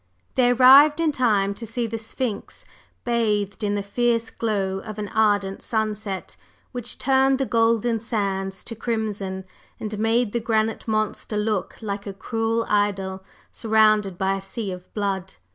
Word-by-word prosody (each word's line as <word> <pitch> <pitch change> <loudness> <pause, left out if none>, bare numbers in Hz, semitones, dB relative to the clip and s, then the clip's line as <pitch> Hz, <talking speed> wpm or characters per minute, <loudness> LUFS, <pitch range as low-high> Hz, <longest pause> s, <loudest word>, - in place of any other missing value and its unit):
They 250 -1 +3
arrived 270 +5 +7
in 325 -2 +2
time 210 -7 +2
to 230 - -10
see 230 +2 -2
the 225 0 -4
Sphinx 220 -1 -5 0.4
bathed 215 -4 0
in 205 0 0
the 200 - -2
fierce 230 +2 0
glow 195 -4 -1
of 215 +2 -8
an 205 -1 -4
ardent 205 -3 +1
sunset, 215 -4 -3 0.4
which 245 -2 -3
turned 265 0 +3
the 270 - 0
golden 230 -1 +2
sands 195 -4 -2
to 230 - -5
crimson, 210 -4 -3 0.3
and 210 -1 -5
made 225 0 +2
the 235 - +1
granite 220 -1 0
monster 215 0 -1
look 210 -3 -1
like 200 -1 -4
a 200 - -4
cruel 225 +2 -1
idol 195 -2 0 0.3
surrounded 215 -4 +3
by 190 +1 +1
a - - -7
sea 195 +1 -4
of 180 0 -9
blood. 195 -3 -2
215 Hz, 155 wpm, -23 LUFS, 200-230 Hz, 0.4 s, arrived